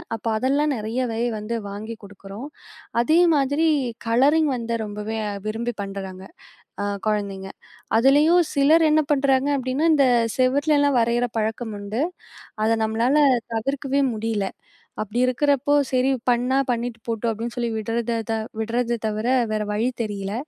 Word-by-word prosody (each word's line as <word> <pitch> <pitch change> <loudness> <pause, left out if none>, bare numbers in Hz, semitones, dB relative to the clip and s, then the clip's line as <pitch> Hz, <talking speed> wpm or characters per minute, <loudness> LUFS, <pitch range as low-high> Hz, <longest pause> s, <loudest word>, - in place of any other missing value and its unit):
அப்போ 225 - -7
அதெல்லாம் 280 +5 +1
நிறையவே 225 +1 -2 0.2
வந்து 210 +3 -4
வாங்கி 215 +3 -6
குடுக்குறோம். 200 +3 -10 0.6
அதே 310 +7 +3 0.2
மாதிரி 285 +3 +1 0.4
கலரிங் 285 +7 +4
வந்து 235 -1 -3
ரொம்பவே 210 +1 -5 0.3
விரும்பி 235 +3 -2
பண்றாங்க 195 -1 -6 0.6
அ - - -1 0.2
குழந்தைங்க. 200 -2 -2 0.5
அதுலயும் 295 +8 +5
சிலர் 305 +4 +5
என்ன 310 +1 +4
பண்றாங்க 270 -1 +2
அப்படின்னா, 260 +4 -1
இந்த 275 -3 +4 0.3
செவர்லெல்லாம் 285 +1 +3
வரையிற 235 +1 +1
பழக்கம் 220 0 -2
உண்டு. 210 +6 -3 0.6
அதை 225 +1 +3
நம்மளால 230 +5 +1 0.4
தவிர்க்கவே 275 +3 -1
முடியலை. 215 -3 -2 0.5
அப்படி 215 +3 -3
இருக்கிறப்போ 285 +2 +1 0.2
"சரி! 255 0 +2 0.2
பண்ணா 245 +2 +2
பண்ணிட்டு 235 -1 -3
போட்டும்." 230 0 -1
அப்படின்னு 230 +3 -5
சொல்லி 240 -1 -1
விடுறத 230 +2 -2 0.2
த - - +1 0.3
விடுறத 235 +2 -1
தவிர 215 +2 -2 0.2
வேறு 215 -1 -1
வழி 220 +4 0 0.2
தெரியல. 200 -2 -4
235 Hz, 130 wpm, -23 LUFS, 215-270 Hz, 0.6 s, அதுலயும்